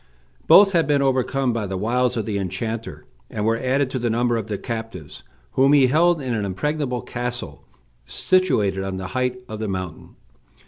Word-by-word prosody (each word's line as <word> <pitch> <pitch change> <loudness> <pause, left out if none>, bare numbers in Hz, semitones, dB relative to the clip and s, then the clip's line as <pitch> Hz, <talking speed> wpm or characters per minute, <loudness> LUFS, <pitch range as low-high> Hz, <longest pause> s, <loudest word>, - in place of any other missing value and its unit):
Both 195 0 +8
had 170 -3 +2
been 145 -2 +2
overcome 130 -1 +1
by 110 -3 -2
the 95 0 -3
wiles 125 +4 0
of 110 - -2
the 100 -1 -2
enchanter, 95 -3 -4 0.2
and 105 -1 -3
were 115 +1 +1
added 130 +1 0
to 130 - -2
the 120 0 -1
number 120 +1 +1
of 110 -2 -3
the 105 -2 -3
captives, 115 - -7 0.3
whom 135 +2 +4
he 140 -3 +6
held 165 +5 +3
in 130 -4 -3
an 110 -2 -1
impregnable 125 +6 -2
castle, 120 0 -5 0.4
situated 105 - +1
on 95 -1 -4
the 95 0 -5
height 125 +3 -1
of 110 -3 -7
the 110 - -3
mountain. 95 -4 -6
120 Hz, 185 wpm, -22 LUFS, 100-130 Hz, 0.4 s, Both